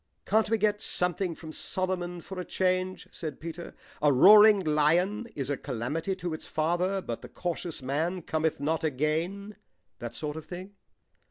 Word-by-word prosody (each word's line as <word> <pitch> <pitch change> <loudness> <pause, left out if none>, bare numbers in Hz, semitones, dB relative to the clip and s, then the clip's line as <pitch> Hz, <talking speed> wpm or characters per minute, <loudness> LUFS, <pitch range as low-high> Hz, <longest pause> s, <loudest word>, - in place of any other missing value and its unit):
"Can't 220 0 +2
we 225 - +3
get 210 0 +1
something 180 -1 0
from 160 -1 -9
Solomon 180 0 -2
for 190 +2 -7
a - - -2
change?" 185 0 -1
said 155 -4 -6
Peter. 170 +1 -7 0.3
"'A 150 -1 +5
roaring 210 +9 +8
lion 175 +8 +2
is 135 0 -2
a 140 - -1
calamity 145 +10 -3
to 175 -3 -4
its 155 - -7
father, 175 +5 0
but 115 - -5
the - - -10
cautious 170 -4 -4
man 160 +7 -1
cometh 160 -1 -1
not 155 +3 -1
again.' 160 +8 -1 0.4
That 120 0 -6
sort 150 0 -4
of 160 - -7
thing." 185 +3 -8
175 Hz, 165 wpm, -28 LUFS, 155-185 Hz, 0.4 s, roaring